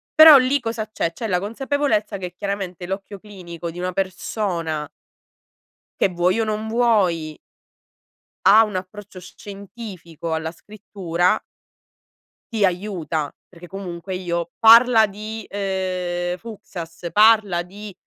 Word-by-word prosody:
però 315 -2 +11
lì 265 +2 +2
cosa 225 -2 -3
c'è? 170 -5 -2
C'è 225 - -5
la 180 -3 +1
consapevolezza 225 0 -1
che 180 -2 -7
chiaramente 195 -3 -4
l'occhio 195 +1 -5
clinico 175 -5 -8
di 175 - -9
una 180 0 -3
persona 180 -5 -3 1.1
che - - +3
vuoi 180 +4 +1
o 225 - +2
non 215 0 -3
vuoi 200 -10 +1 1.1
ha 220 +2 +8
un 210 -3 -4
approccio 185 +1 -7
sc 180 - -14
scientifico 195 -5 -8
alla 160 0 -3
scrittura 185 -1 -2 1.1
ti 215 -2 +1
aiuta, 175 -5 -1 0.2
perché 175 -1 -13
comunque 185 -1 -6
io 170 -2 -3
parla 230 0 +7
di, 215 +2 -7
uhm, 185 -3 -2
Fuksas, 175 -6 -8
parla 210 -5 +4
di, 200 +3 -10
195 Hz, 125 wpm, -21 LUFS, 175-215 Hz, 1.1 s, però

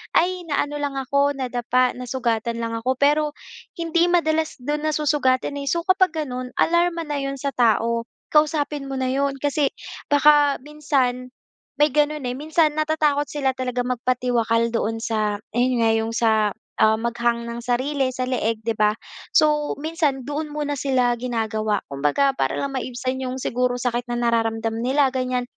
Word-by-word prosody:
"Ay 360 +1 +2
na 290 - 0
ano 295 0 -6
lang 285 -1 -2
ako, 280 +2 +1
nadapa, 250 0 +1
nasugatan 235 -2 -2
lang 230 0 -3
ako." 250 +3 0
Pero 295 +2 +4 0.6
hindi 335 +1 +2
madalas 320 -3 +1
do'n 295 +3 -2
nasusugatan 290 -3 +1
eh. 280 - -5
So, 340 - +1
kapag 370 -2 +3
gano'n, 250 -1 -5
alarma 340 0 +2
na 295 -1 -2
'yon 275 0 -4
sa 280 +1 -2
tao. 230 0 +2 0.3
Kausapin 300 -2 +2
mo - - -3
na 260 - 0
'yon, 275 0 0
kasi 290 -1 +1 0.4
baka 290 0 +5
minsan 265 -4 -1 0.5
may 295 - +6
gano'n 300 0 +1
eh, 245 - -3
minsan 310 0 +1
natatakot 305 -2 +1
sila 275 -3 0
talaga 250 -1 -2
magpatiwakal 240 -2 +1
doon 225 0 -1
sa 215 -3 -1 0.2
ayon 250 +1 +3
nga, 225 - +4
'yong 225 0 -1
sa, 225 -1 +3 0.5
ah, 220 0 +5
mag-hang 235 0 -1
ng 235 0 -5
sarili 260 +2 0
sa 255 0 -2
leeg, 225 -3 -1
'di 230 0 0
ba. 210 -1 +3 0.4
So, 300 -1 +3
minsan 310 -4 0
doon 295 +1 -4
muna 295 -1 -2
sila 255 -3 +2
ginagawa, 220 -4 -1
kumbaga 145 - +1
para - - 0
lang 280 -1 -3
maibsan 255 +1 -3
'yong 255 0 -3
siguro 250 +1 0
sakit 245 0 -1
na 240 - -1
nararamdam 225 -1 0
nila 270 +1 +3
ganyan. 255 -1 -1
260 Hz, 160 wpm, -22 LUFS, 235-295 Hz, 0.6 s, may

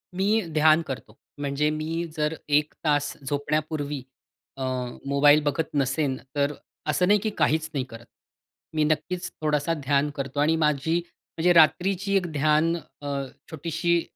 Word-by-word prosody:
मी 205 +4 +2
ध्यान 155 +1 +5
करतो. 125 -7 -7 0.2
म्हणजे 145 +1 0
मी 155 +2 -2
जर 150 0 +1
1 150 +1 +2
तास 145 -1 +1
झोपण्यापूर्वी 145 -1 -2 0.5
अ, 135 - -4 0.4
मोबाईल 145 +2 +5
बघत 150 +2 0
नसेन, 135 0 +1 0.2
तर 145 0 +1 0.4
असं 180 +4 +2
नाही, 205 +1 +5
की 215 - -1
काहीच 160 +1 +2
नाही 135 -3 0
करत. 115 +1 -11 0.7
मी 155 - +3
नक्कीच 155 +4 -1
थोडासा 150 +1 +1
ध्यान 140 +1 +2
करतो 135 0 -4
आणि 155 +2 +3
माझी 150 0 +1
म्हणजे 175 0 -2
रात्रीची 185 +4 +4
एक 185 - 0
ध्यान 155 +3 +2
अ, 145 -3 -11 0.4
छोटीशी, 170 +2 0
150 Hz, 140 wpm, -26 LUFS, 145-165 Hz, 0.7 s, ध्यान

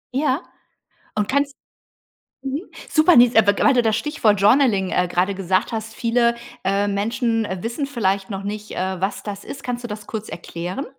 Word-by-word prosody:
Ja. 285 +2 +1 0.7
Und 210 -1 0
kannst 280 +1 +1 0.9
mhm, 275 +4 -3 0.3
super, 315 +3 +5
ne, 240 - +9
ist 245 - -5
aber 205 -2 +5
w - - +1
weil 275 - +6
du 245 - +4
das 220 -1 +1
Stichwort 215 -9 +1
Journaling, 205 -3 +4
äh, 180 - +1
gerade 185 +3 +1
gesagt 190 +3 0
hast. 220 0 -4
Viele, 235 +1 +2 0.3
äh, 200 +2 +1
Menschen, 225 +3 0
äh, 190 -2 -4
wissen 235 +6 -2
vielleicht 200 -8 -1
noch 195 -1 -5
nicht, 210 +1 -5
äh, 185 -1 -3
was 195 +2 -1
das 205 -1 -6
ist. 275 - -8
Kannst 245 0 -4
du 240 - -4
das 210 0 -7
kurz 220 -1 -5
erklären? 175 - -5
215 Hz, 190 wpm, -21 LUFS, 200-245 Hz, 0.9 s, ne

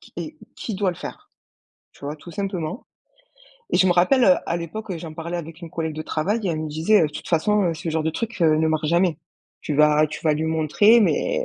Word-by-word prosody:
qui - - -19
et, 310 0 -6 0.2
qui 220 - -5
doit 195 -1 0
le 175 - -9
faire?» - - -9 0.6
tu - - -20
vois? 145 +2 -4
Tout 170 - -12
simplement. 195 -1 -4 0.9
Et - - +2
je 190 - +4
me 180 - +4
rappelle, 215 +9 +4
heu, 185 - +7
à 170 - -1
l'époque, 185 +6 -6
heu, 175 - -3
j'en 160 -1 -8
parlais 170 +2 -5
avec 165 -1 -8
une 170 - -8
collègue 160 -1 -3
de 155 - -5
travail 195 +10 -1
et - - 0
elle 160 -2 -1
me 155 - -4
disait: 165 +7 +3
«Heu, 155 - +2
toute - - -8
façon, 205 +5 +2
heu, 170 -2 0
ce 165 +1 -5
genre 160 0 0
de 160 - 0
truc, 230 +5 -5
heu, 155 -2 +4
ne 160 +1 +2
marche 155 -1 0
jamais. 170 -1 +2 0.4
Tu 150 - -3
vas 150 +1 +4
tu 150 - -7
vas 155 - +4
lui 150 +2 -1
montrer 160 +9 +4
mais, - - +1
165 Hz, 250 wpm, -23 LUFS, 155-195 Hz, 0.9 s, heu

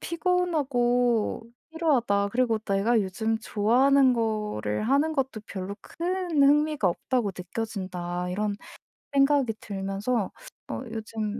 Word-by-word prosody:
피곤하고 265 - +1 0.3
피로하다.' 240 -12 +1
그리고 240 -3 +2
'내가 215 +2 +1
요즘 220 +3 -1
좋아하는 255 +6 +3
거를 210 - -1
하는 285 +4 +3
것도 265 -6 -2
별로 195 +1 -5
큰 345 - -1
흥미가 295 -6 +4
없다고 225 +4 -1
느껴진다.' 180 -3 -4
이런 205 +2 -1 0.6
생각이 275 -4 +3
들면서 195 +2 -2 0.4
어 - - -4
요즘 220 -1 -4
225 Hz, 260 characters per minute, -26 LUFS, 200-275 Hz, 0.6 s, 흥미가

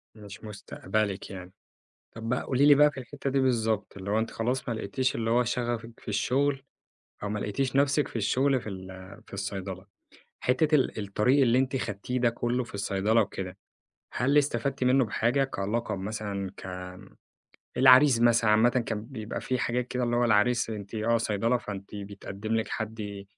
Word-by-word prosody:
مش 105 -1 -11
مستقبلِك 105 -1 -3
يعني. 95 -2 -8 0.6
طب 115 0 -6
بقى 125 +2 0
قولي 135 +2 +2
لي 145 - +9
بقى 150 +1 +6
في 140 - -8
الحتة 135 +2 -5
دي 135 0 +2
بالضبط، 110 -6 0
اللي 100 0 -5
هو 105 - +2
أنتِ 110 +1 -1
خلاص 125 +3 -2
ما 115 - 0
لقيتيش 125 +4 -1
اللي 115 0 -1
هو 120 +1 +3
شغفِك 120 -1 -3
في - - -15
الشغل 135 +7 +1 0.6
أو 105 - -2
ما 105 +1 -2
لقيتيش 125 +7 -2
نفسِك 140 +1 +3
في - - -15
الشغل 130 +4 +2
في 110 - -7
ال 95 0 -9
في - - -16
الصيدلة. 95 -1 -5 0.6
حتة 150 +5 +2
ال 135 -5 +2
الطريق 125 +8 +3
اللي 125 -1 +4
أنتِ 130 0 0
خدتيه 115 +1 -3
ده 120 -1 +3
كله 120 +2 -1
في 120 - -15
الصيدلة 100 +3 +1
وكده، 95 -3 -3 0.6
هل 135 +5 +2
استفدتِ 140 -1 0
منه 130 +1 +4
بحاجة 120 +5 +1
كلقب 105 -3 -2
مثلًا 100 -1 -4
ك - - -10 1.1
العريس 130 0 +7
مثلًا 115 -2 +4
عامةً 110 +3 +5
كان 115 -4 -2
بيبقى 110 -5 -6
فيه 130 - -1
حاجات 125 +1 -1
كده 125 0 -1
اللي 120 0 0
هو 120 - +3
العريس 115 +1 +3
أنتِ 105 -1 -7
آه 110 +2 +2
صيدلة 115 +2 +1
فأنتِ 100 -3 -8
بيتقدم 100 +1 -5
لِك 110 0 0
حد 105 -2 -5
115 Hz, 175 wpm, -28 LUFS, 105-125 Hz, 1.1 s, لي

